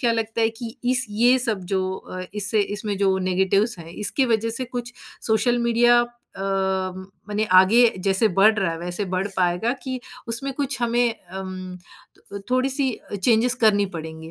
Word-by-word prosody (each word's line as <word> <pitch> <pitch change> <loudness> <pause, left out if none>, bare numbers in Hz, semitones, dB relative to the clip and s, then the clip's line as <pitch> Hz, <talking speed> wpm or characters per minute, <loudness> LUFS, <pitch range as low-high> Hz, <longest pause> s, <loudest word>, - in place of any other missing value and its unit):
क्या 235 -4 +2
लगता 225 0 -2
है 225 - +4
कि 235 -2 -7
इस 250 +1 +4
ये 240 +5 +4
सब 225 -6 -1
जो 190 -1 +2
अ, 185 - -8
इससे 210 +1 +1 0.2
इसमें 205 -1 -3
जो 195 -1 +2
नेगेटिव्स 190 +3 +1
हैं 165 - -10
इसकी 210 +9 0
वजह 230 -1 +1
से 245 +3 -3
कुछ 245 0 -6 0.3
सोशल 240 +2 +2
मीडिया 240 0 +4 0.4
अम, 190 -1 -2 0.2
मने 210 +1 0
आगे 225 +6 +6 0.2
जैसे 195 +2 +3
बढ़ 215 +3 +7
रहा 190 -4 +1
है 165 - -6
वैसे 175 +4 -4
बढ़ 185 +2 0
पाएगा 180 +6 +1
कि 260 -1 -4 0.3
उसमें 270 +4 -1
कुछ 275 -2 -2
हमें 235 0 +2
अम, 185 -1 -7 0.7
थोड़ी-सी 265 +1 +1 0.3
चेंजेस 235 +1 +3
करनी 205 -2 +4
पड़ेंगी? 160 0 -8
215 Hz, 165 wpm, -23 LUFS, 190-240 Hz, 0.7 s, बढ़